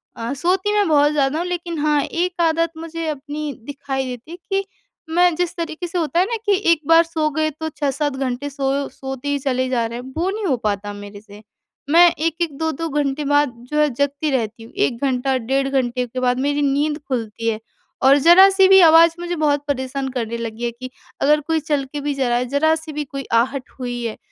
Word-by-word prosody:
अ, 230 Hz, +3 st, -4 dB
सोती 370 Hz, +8 st, 0 dB
मैं 410 Hz, -2 st, +2 dB
बहुत 295 Hz, -2 st, +4 dB
ज़्यादा 290 Hz, 0 st, +1 dB
हूँ 350 Hz, -, -2 dB
लेकिन 345 Hz, -1 st, -4 dB
हाँ 300 Hz, -1 st, +2 dB
1 350 Hz, +1 st, -2 dB
आदत 330 Hz, 0 st, +2 dB
मुझे 330 Hz, 0 st, -5 dB
अपनी 300 Hz, +1 st, -5 dB
दिखाई 275 Hz, -1 st, -4 dB
देती 255 Hz, +6 st, -7 dB
कि 390 Hz, 0 st, 0 dB, 0.4 s
मैं 350 Hz, +1 st, +3 dB
जिस 350 Hz, 0 st, -2 dB
तरीके 335 Hz, 0 st, -4 dB
से 345 Hz, -, -4 dB
होता 335 Hz, 0 st, 0 dB
है 365 Hz, -, +4 dB
ना 465 Hz, +3 st, -2 dB
कि 410 Hz, -2 st, +4 dB, 0.2 s
एक 330 Hz, -2 st, +2 dB
बार 330 Hz, 0 st, +6 dB
सो 320 Hz, -2 st, -1 dB
गए 310 Hz, +1 st, 0 dB
तो 315 Hz, +2 st, -5 dB
6-7 290 Hz, -1 st, -2 dB
घंटे 265 Hz, +1 st, -3 dB
सो 275 Hz, 0 st, -1 dB
सोते 265 Hz, 0 st, -7 dB
ही 285 Hz, 0 st, 0 dB
चले 260 Hz, -1 st, -1 dB
जा 240 Hz, -3 st, 0 dB
रहे 235 Hz, +1 st, -5 dB
हैं 260 Hz, +1 st, -10 dB
वो 350 Hz, +3 st, 0 dB
नहीं 420 Hz, +1 st, -3 dB
हो 290 Hz, -8 st, +2 dB
पाता 205 Hz, -2 st, -3 dB
मेरे 205 Hz, 0 st, -10 dB
से। 210 Hz, -1 st, -14 dB, 0.5 s
मैं 340 Hz, +3 st, +7 dB
1-1, 330 Hz, +1 st, -2 dB
2-2 320 Hz, +1 st, -2 dB
घंटे 290 Hz, 0 st, -1 dB
बाद 290 Hz, -2 st, +2 dB, 0.2 s
जो 300 Hz, -, -1 dB
है 300 Hz, 0 st, +4 dB
जगती 285 Hz, +4 st, -1 dB
रहती 225 Hz, -3 st, -2 dB
हूँ। 225 Hz, -, -14 dB
1 275 Hz, -, 0 dB
घंटा 265 Hz, 0 st, 0 dB
डेढ़ 270 Hz, +3 st, -1 dB
घंटे 250 Hz, -2 st, 0 dB
के 255 Hz, +2 st, -5 dB
बाद 250 Hz, 0 st, +1 dB
मेरी 285 Hz, +2 st, 0 dB
नींद 290 Hz, +2 st, +1 dB
खुलती 230 Hz, -3 st, -2 dB
है। 215 Hz, -1 st, -2 dB, 0.4 s
और 270 Hz, +2 st, +6 dB
ज़रा-सी 380 Hz, +5 st, +7 dB
भी 385 Hz, 0 st, +7 dB
आवाज़ 330 Hz, 0 st, +7 dB
मुझे 350 Hz, 0 st, -3 dB
बहुत 290 Hz, -3 st, +1 dB
परेशान 265 Hz, 0 st, -2 dB
करने 235 Hz, -3 st, -3 dB
लगी 230 Hz, 0 st, -6 dB
है 235 Hz, -, -1 dB
कि 255 Hz, +2 st, -9 dB, 0.3 s
अगर 300 Hz, +2 st, +4 dB
कोई 325 Hz, -1 st, +1 dB
चल 295 Hz, -2 st, -1 dB
के 295 Hz, -, -3 dB
भी 290 Hz, 0 st, -1 dB
जा 270 Hz, -2 st, -1 dB
रहा 240 Hz, -, +2 dB
है 250 Hz, -, -1 dB
ज़रा-सी 315 Hz, +3 st, +1 dB
भी 300 Hz, 0 st, -2 dB
कोई 275 Hz, 0 st, -6 dB
आहट 255 Hz, +3 st, +1 dB
हुई 245 Hz, -1 st, -4 dB
है 225 Hz, -, -4 dB
285 Hz, 215 wpm, -20 LUFS, 255-325 Hz, 0.5 s, मैं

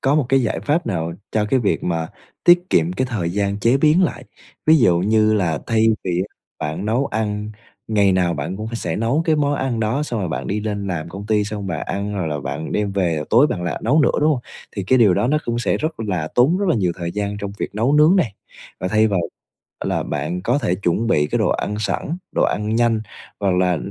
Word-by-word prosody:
có 135 Hz, +2 st, +2 dB
một 150 Hz, -4 st, +2 dB
cái 135 Hz, -1 st, +3 dB
giải 110 Hz, -, -1 dB
pháp 155 Hz, +1 st, 0 dB
nào 85 Hz, -5 st, -2 dB, 0.2 s
cho 110 Hz, -1 st, +1 dB
cái 130 Hz, -, +3 dB
việc 105 Hz, -, 0 dB
mà 80 Hz, -2 st, -1 dB, 0.4 s
tiết 175 Hz, +1 st, +5 dB
kiệm 85 Hz, +2 st, +2 dB
cái 130 Hz, +7 st, -1 dB
thời 90 Hz, -8 st, -1 dB
gian 100 Hz, +1 st, -1 dB
chế 115 Hz, +5 st, +3 dB
biến 155 Hz, +5 st, +4 dB
lại. 180 Hz, -, -1 dB, 0.4 s
Ví 160 Hz, +1 st, +7 dB
dụ 90 Hz, -10 st, +4 dB
như 110 Hz, +3 st, +3 dB
là 85 Hz, -7 st, 0 dB
thay 115 Hz, -1 st, +1 dB, 0.2 s
vì 90 Hz, -1 st, 0 dB
á -, -, -39 dB, 0.3 s
bạn 80 Hz, +6 st, -3 dB
nấu 120 Hz, +5 st, +1 dB
ăn, 105 Hz, -1 st, -3 dB, 0.4 s
ngày 100 Hz, -3 st, +3 dB
nào 90 Hz, -2 st, +1 dB
bạn 95 Hz, -, -4 dB
cũng 110 Hz, -, -5 dB
sẽ -, -, -3 dB
nấu 120 Hz, +8 st, +1 dB
cái 155 Hz, -2 st, +2 dB
món 145 Hz, -1 st, +1 dB
ăn 130 Hz, -5 st, -2 dB
đó, 115 Hz, +7 st, 0 dB
xong 120 Hz, -7 st, -3 dB
rồi 90 Hz, -, -2 dB
bạn 80 Hz, -, -4 dB
đi 105 Hz, +2 st, -1 dB
lên 105 Hz, -2 st, -3 dB
làm 85 Hz, -3 st, -3 dB
công 100 Hz, +4 st, -8 dB
ty, 105 Hz, -1 st, +2 dB
xong 105 Hz, -1 st, -5 dB
bạn 85 Hz, -4 st, -3 dB
ăn 100 Hz, +1 st, -3 dB
rồi 90 Hz, -5 st, -2 dB
là 75 Hz, -1 st, -2 dB
bạn 80 Hz, +3 st, -5 dB
đem 105 Hz, -1 st, -1 dB
về, 85 Hz, -6 st, 0 dB
tối 125 Hz, +6 st, +6 dB
bạn 90 Hz, -11 st, -3 dB
lại 90 Hz, -, -3 dB
nấu 140 Hz, +8 st, +4 dB
nữa, -, -, +4 dB
đúng 155 Hz, +1 st, +4 dB
hông? 135 Hz, -, 0 dB, 0.4 s
Thì 100 Hz, -, -2 dB
cái 130 Hz, +7 st, +3 dB
điều 105 Hz, -6 st, +5 dB
đó 120 Hz, -, +1 dB
nó 150 Hz, +4 st, +2 dB
cũng 120 Hz, 0 st, -1 dB
sẽ 120 Hz, -, +1 dB
rất 155 Hz, -4 st, -3 dB
là 90 Hz, -8 st, -2 dB
tốn 140 Hz, +9 st, +4 dB
rất 200 Hz, -, 0 dB
là -, -, +3 dB
nhiều 90 Hz, -6 st, +1 dB
thời 85 Hz, -1 st, -3 dB
gian 100 Hz, 0 st, -3 dB
trong 100 Hz, 0 st, -4 dB
việc -, -, -4 dB
nấu 115 Hz, +6 st, +1 dB
nướng 150 Hz, +5 st, +5 dB
này. 120 Hz, -, +1 dB, 0.5 s
Và 90 Hz, -, -1 dB
thay 110 Hz, +3 st, +3 dB
vào 100 Hz, -4 st, +1 dB, 0.7 s
là -, -, -1 dB
bạn 75 Hz, +5 st, -3 dB
có 120 Hz, +8 st, +1 dB
thể 110 Hz, -10 st, 0 dB
chuẩn 100 Hz, +4 st, 0 dB
bị 75 Hz, -10 st, +2 dB
cái -, -, -1 dB
đồ -, -, +2 dB
ăn 105 Hz, -, -1 dB
sẵn, 150 Hz, -, -2 dB, 0.2 s
đồ -, -, +3 dB
ăn 105 Hz, +1 st, 0 dB
nhanh, 115 Hz, -2 st, +2 dB, 0.4 s
hoặc 100 Hz, -2 st, +1 dB
là 90 Hz, -1 st, +2 dB
105 Hz, 250 wpm, -20 LUFS, 90-125 Hz, 0.7 s, Ví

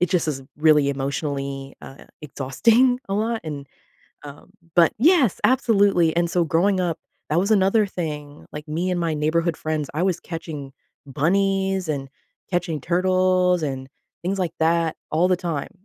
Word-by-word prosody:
It 180 Hz, -, +2 dB
just 180 Hz, -3 st, +1 dB
is 140 Hz, -3 st, -3 dB
really 150 Hz, -2 st, +4 dB
emotionally, 140 Hz, 0 st, -3 dB
uh, 135 Hz, -, -12 dB, 0.2 s
exhausting 230 Hz, -, +2 dB
a 195 Hz, -, 0 dB
lot, 225 Hz, +2 st, -1 dB
and, 145 Hz, -3 st, -6 dB, 0.6 s
uh, 145 Hz, -1 st, -11 dB, 0.3 s
but 170 Hz, -2 st, +5 dB
yes, 285 Hz, -, +4 dB
absolutely, 200 Hz, -10 st, +3 dB
and 170 Hz, 0 st, +1 dB
so 175 Hz, -2 st, +2 dB
growing 185 Hz, +5 st, +2 dB
up, 175 Hz, -3 st, -1 dB, 0.3 s
that 155 Hz, -, +2 dB
was 200 Hz, +4 st, 0 dB
another 205 Hz, +1 st, +3 dB
thing, 150 Hz, -6 st, -6 dB
like, 150 Hz, 0 st, -7 dB
me 165 Hz, +4 st, -2 dB
and 180 Hz, -1 st, -1 dB
my 165 Hz, -2 st, 0 dB
neighborhood 160 Hz, +2 st, 0 dB
friends 155 Hz, -3 st, -3 dB
I 160 Hz, -, -1 dB
was 185 Hz, -2 st, 0 dB
catching 160 Hz, -5 st, -7 dB, 0.3 s
bunnies 190 Hz, +5 st, 0 dB
and 140 Hz, -3 st, -2 dB, 0.4 s
catching 175 Hz, -4 st, -1 dB
turtles 185 Hz, +1 st, +2 dB
and 135 Hz, -2 st, -4 dB, 0.3 s
things 195 Hz, +3 st, -2 dB
like 175 Hz, -3 st, -1 dB
that 165 Hz, 0 st, +1 dB, 0.2 s
all 170 Hz, +4 st, +3 dB
the 185 Hz, -, +3 dB
time, 170 Hz, -5 st, -4 dB
170 Hz, 160 wpm, -22 LUFS, 150-185 Hz, 0.6 s, but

